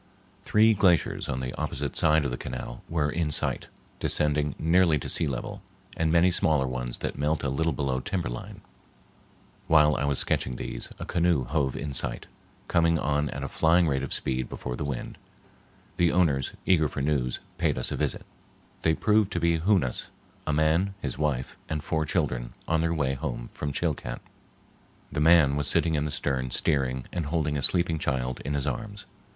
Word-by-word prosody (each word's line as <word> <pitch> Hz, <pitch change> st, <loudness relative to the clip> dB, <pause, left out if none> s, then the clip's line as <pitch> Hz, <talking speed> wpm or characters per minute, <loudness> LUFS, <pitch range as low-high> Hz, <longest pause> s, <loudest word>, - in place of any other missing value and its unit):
Three 110 Hz, +1 st, +4 dB
glaciers 95 Hz, -5 st, +2 dB
on 65 Hz, -1 st, -2 dB
the 65 Hz, 0 st, -4 dB
opposite 70 Hz, -1 st, -3 dB
side 75 Hz, -1 st, +4 dB
of 70 Hz, -, -1 dB
the -, -, -1 dB
canal -, -, -6 dB
were 75 Hz, -3 st, 0 dB
in 80 Hz, -1 st, -1 dB
sight, 75 Hz, -, -1 dB, 0.3 s
descending 75 Hz, -1 st, +1 dB
nearly 85 Hz, -1 st, +4 dB
to -, -, -5 dB
sea 80 Hz, -, 0 dB
level, 65 Hz, -3 st, -4 dB, 0.3 s
and 80 Hz, -1 st, +1 dB
many 85 Hz, +2 st, +5 dB
smaller 80 Hz, -7 st, +2 dB
ones 65 Hz, -1 st, -4 dB
that -, -, -4 dB
melt 75 Hz, +2 st, 0 dB
a 70 Hz, -, 0 dB
little 80 Hz, +5 st, 0 dB
below 70 Hz, -4 st, -1 dB
timber 90 Hz, +6 st, -2 dB
line. -, -, -7 dB, 1.1 s
While 75 Hz, -2 st, +5 dB
I 70 Hz, -, -1 dB
was 70 Hz, -1 st, 0 dB
sketching 60 Hz, -, 0 dB
these, -, -, -6 dB
a -, -, -6 dB
canoe 85 Hz, -5 st, +2 dB
hove 70 Hz, 0 st, -1 dB
in 70 Hz, 0 st, -4 dB
sight, -, -, -1 dB, 0.4 s
coming 85 Hz, -1 st, +3 dB
on 75 Hz, -1 st, 0 dB
at 70 Hz, +1 st, -5 dB
a -, -, -2 dB
flying 85 Hz, +4 st, +3 dB
rate 70 Hz, -3 st, 0 dB
of -, -, -5 dB
speed 65 Hz, -1 st, -2 dB
before 60 Hz, -, -5 dB
the 75 Hz, -, -4 dB
wind. 70 Hz, -4 st, -5 dB, 0.8 s
The 85 Hz, -1 st, +3 dB
owners, 75 Hz, -7 st, +2 dB
eager 80 Hz, -5 st, +4 dB
for 70 Hz, -, -4 dB
news, 70 Hz, -4 st, 0 dB, 0.2 s
paid -, -, +1 dB
us 65 Hz, -, +1 dB
a -, -, -1 dB
visit. -, -, -1 dB, 0.6 s
They 80 Hz, -1 st, +2 dB
proved 105 Hz, 0 st, +2 dB
to 85 Hz, -, 0 dB
be 85 Hz, -1 st, +2 dB
Hoonas, 85 Hz, -, +1 dB, 0.4 s
a -, -, +2 dB
man, 80 Hz, +6 st, +2 dB
his 70 Hz, -5 st, -4 dB
wife, 70 Hz, -4 st, -1 dB
and 75 Hz, -2 st, -2 dB
four 80 Hz, 0 st, 0 dB
children, -, -, -1 dB
on 80 Hz, 0 st, +2 dB
their 85 Hz, 0 st, +1 dB
way 75 Hz, -5 st, 0 dB
home 65 Hz, -4 st, -5 dB
from 75 Hz, -, -3 dB
Chilcat. -, -, -2 dB, 0.9 s
The 75 Hz, -, -1 dB
man 80 Hz, -3 st, +6 dB
was 75 Hz, -1 st, 0 dB
sitting 80 Hz, -, +2 dB
in 75 Hz, -1 st, +1 dB
the -, -, -2 dB
stern 65 Hz, -3 st, -1 dB
steering 65 Hz, -2 st, 0 dB
and 85 Hz, -5 st, -2 dB
holding 75 Hz, -2 st, 0 dB
a 70 Hz, -, -1 dB
sleeping 85 Hz, +1 st, +2 dB
child 65 Hz, -3 st, -2 dB
in 70 Hz, +1 st, -2 dB
his 70 Hz, -, -1 dB
arms. 105 Hz, -2 st, -4 dB
75 Hz, 190 wpm, -27 LUFS, 65-85 Hz, 1.1 s, man